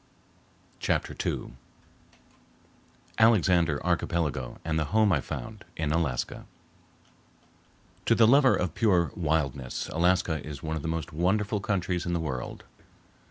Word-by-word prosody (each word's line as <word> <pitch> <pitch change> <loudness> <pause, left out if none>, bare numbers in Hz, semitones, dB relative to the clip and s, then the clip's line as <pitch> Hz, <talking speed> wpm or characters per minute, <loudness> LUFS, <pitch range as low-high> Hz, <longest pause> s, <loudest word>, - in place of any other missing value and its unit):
Chapter - - -1
II - - -3 1.7
Alexander 90 -9 +4
Archipelago 80 -7 -1
and 80 0 0
the 80 - 0
Home 110 +3 +3
I 75 -6 +2
found 110 - -7
in 75 -3 -1
Alaska 80 -6 -2 1.6
To - - +5
the 115 - +6
lover 135 +3 +6
of 90 -3 -2
pure 90 -7 +2
wildness 75 -6 -1
Alaska 85 -2 +1
is 75 -3 -8
one 80 0 -2
of 80 - -3
the 80 - -4
most 80 -3 -3
wonderful 100 +6 +1
countries 90 -3 -1
in 85 - -1
the 85 - 0
world. 65 -6 -5
85 Hz, 125 wpm, -28 LUFS, 75-95 Hz, 1.7 s, the